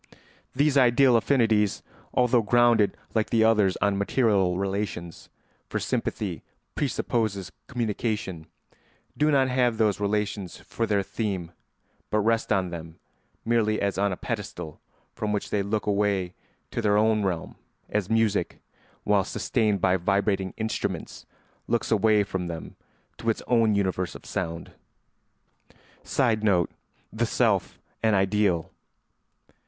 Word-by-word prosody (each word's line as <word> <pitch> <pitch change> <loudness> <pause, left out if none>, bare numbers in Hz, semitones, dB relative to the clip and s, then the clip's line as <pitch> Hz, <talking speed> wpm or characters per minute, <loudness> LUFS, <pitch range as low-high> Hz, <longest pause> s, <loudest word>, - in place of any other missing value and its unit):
These 140 +1 +3
ideal 125 0 +5
affinities, 110 -4 +2 0.3
although 125 -1 +3
grounded 120 -1 +3 0.2
like 110 -2 0
the 115 -1 +3
others 105 -4 +3
on 100 -1 +1
material 100 -5 +2
relations 95 -4 -4 0.4
(for - - -2
sympathy - - -2 0.3
presupposes 110 - -1 0.2
communication), 105 -7 -3 0.7
do 150 +1 +2
not 135 -3 +3
have 125 -3 +2
those 105 -3 +2
relations 100 -2 -2
for 115 - -3
their 100 -2 +1
theme 95 -5 -3 0.6
but 105 - +1
rest 115 +2 +1
on 95 -3 +1
them 80 -1 -8 0.5
merely 110 -2 +2
as 100 -2 -1
on 100 0 +2
a 90 - -3
pedestal 75 - -6 0.3
from 105 -1 -3
which 105 -1 -2
they 105 - +1
look 105 +2 -2
away 100 -3 0 0.4
to 115 - -2
their 105 -2 +3
own 110 0 +3
realm, 90 -4 -3 0.3
as 105 -3 -2
music, 110 -5 +1 0.4
while 105 -2 +3
sustained 105 0 0
by 95 0 +3
vibrating 100 0 0
instruments, 110 0 -4 0.4
looks 120 0 -1
away 110 -1 +4
from 95 -3 -4
them 85 -1 -7 0.4
to 115 - -1
its 110 - -1
own 115 -3 +3
universe 95 -2 -1
of - - -11
sound. 85 -2 -4 1.3
[Sidenote: 110 - +1 0.4
The - - 0
self - - +1 0.2
an 110 -2 +3
ideal. 95 -3 +1
105 Hz, 125 wpm, -26 LUFS, 95-115 Hz, 1.3 s, ideal